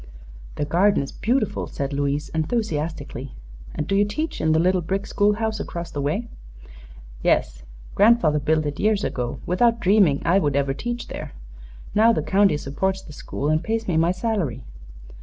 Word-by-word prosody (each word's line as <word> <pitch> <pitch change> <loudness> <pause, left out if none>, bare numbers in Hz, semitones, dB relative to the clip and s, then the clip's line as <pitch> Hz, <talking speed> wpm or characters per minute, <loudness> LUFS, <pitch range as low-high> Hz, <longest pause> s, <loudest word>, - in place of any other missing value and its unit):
"The 145 - -1
garden 185 +2 +3
is 140 - -7
beautiful," 235 -1 -1
said 140 0 -4
Louise, 140 +1 -1
enthusiastically. 155 - -3 0.4
"And 150 - -2
do 195 - 0
you 200 - +4
teach 295 +11 -3
in 155 - +2
the 160 - +3
little 180 +2 +2
brick 195 +4 -2
school 205 +1 +2
house 220 0 -2
across 170 -3 -5
the 145 - -3
way?" 175 +12 -1 0.9
"Yes. - - +1 0.3
Grandfather 205 -8 +4
built 155 +2 +1
it 145 -1 -4
years 210 -1 +2
ago, 120 -1 -3
without 230 +6 +2
dreaming 190 -8 +3
I 185 +4 +4
would 145 -6 0
ever 140 -1 +1
teach 240 - -4
there. - - -7 0.6
Now 225 +2 +5
the - - -1
county 195 -5 +3
supports 190 +8 -2
the 150 - -12
school 145 0 -4
and 155 +2 +1
pays 225 +2 -2
me 175 - 0
my 165 +2 +3
salary." 180 - -2
175 Hz, 175 wpm, -23 LUFS, 145-210 Hz, 0.9 s, Now